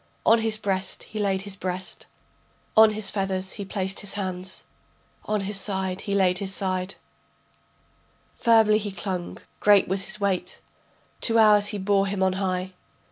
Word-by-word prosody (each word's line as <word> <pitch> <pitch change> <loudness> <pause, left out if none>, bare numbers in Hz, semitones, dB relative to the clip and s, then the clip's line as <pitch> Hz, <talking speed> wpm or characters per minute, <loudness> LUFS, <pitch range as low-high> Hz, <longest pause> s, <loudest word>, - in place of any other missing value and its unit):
On 225 +1 +6
his 220 -1 +1
breast 195 -2 -3
he 215 - -7
laid 195 -2 0
his 200 -1 -5
breast, 185 0 -5 0.7
On 220 0 +8
his 215 -2 -2
feathers 190 -2 -1
he 200 - -6
placed 190 -1 -2
his 205 - -3
hands, 185 -2 -2 0.6
On 215 -1 0
his 195 +1 0
side 190 -1 -3
laid 190 -2 +2
his 195 -1 -3
side, 185 0 -2 1.4
Firmly 220 -2 +4
he 205 -1 -4
clung, 185 -2 -5 0.2
great 205 -2 +5
was 190 +1 -2
his 215 0 -7
weight. 200 -3 -1 0.6
Two 230 -1 +3
hours 210 -2 +6
he 205 0 -3
bore 195 0 +2
him 195 -1 -1
on 190 -1 +2
high. 185 -1 -2
195 Hz, 155 wpm, -25 LUFS, 190-210 Hz, 1.4 s, On